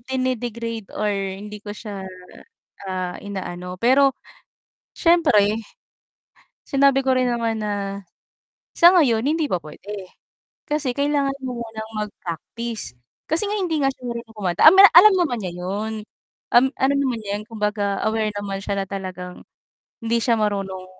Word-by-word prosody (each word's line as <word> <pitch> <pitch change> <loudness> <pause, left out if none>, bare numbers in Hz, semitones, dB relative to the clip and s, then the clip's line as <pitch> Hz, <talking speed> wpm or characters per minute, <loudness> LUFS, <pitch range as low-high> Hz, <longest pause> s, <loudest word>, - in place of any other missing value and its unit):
dinedegrade 235 -4 -3
or 210 - 0
hindi 200 +1 -5
ko 205 - -7
siya, 205 -3 -7 0.8
ah, 185 -1 -3
inaano. 180 -2 -6
Pero 270 +3 +5 0.8
siyempre 230 -12 +3 1.1
sinabi 275 0 +3
ko 260 - +3
rin 255 -1 +2
naman 230 -2 -1
na 210 -1 -2 1.0
sa 345 +1 +8
ngayon 240 -9 +3
hindi 315 +1 +1
pa 180 - +1
puwede. 195 +5 -9 0.6
Kasi 295 -4 -1
kailangan 280 -1 +1
mo 250 -2 -4
munang 220 -1 -7 0.2
mag-practice. 210 - -6 0.3
Kasi 320 +6 +1
nga 420 - -1
hindi 350 -5 -1
nga 270 - +3
siya 255 -1 -11
marunong 235 -1 -6
kumanta, 180 -4 -1
amina 390 +3 +9
alam 410 +4 +10
naman 310 -9 +1
niya 180 -2 -4
'yon, 200 +5 -3 0.6
um, 245 +2 +7
alam 275 +1 +2
naman 265 -4 0
niya 200 - -7
'yon. 215 - -9
Kumbaga 210 -2 -1
aware 220 -1 0
naman 200 -1 -4
siya 200 -1 -2
na 195 - -3
talagang 185 -2 -7 0.6
hindi 230 +1 +1
siya 230 -2 +2
marunong 195 -3 -2
225 Hz, 145 wpm, -22 LUFS, 200-265 Hz, 1.1 s, alam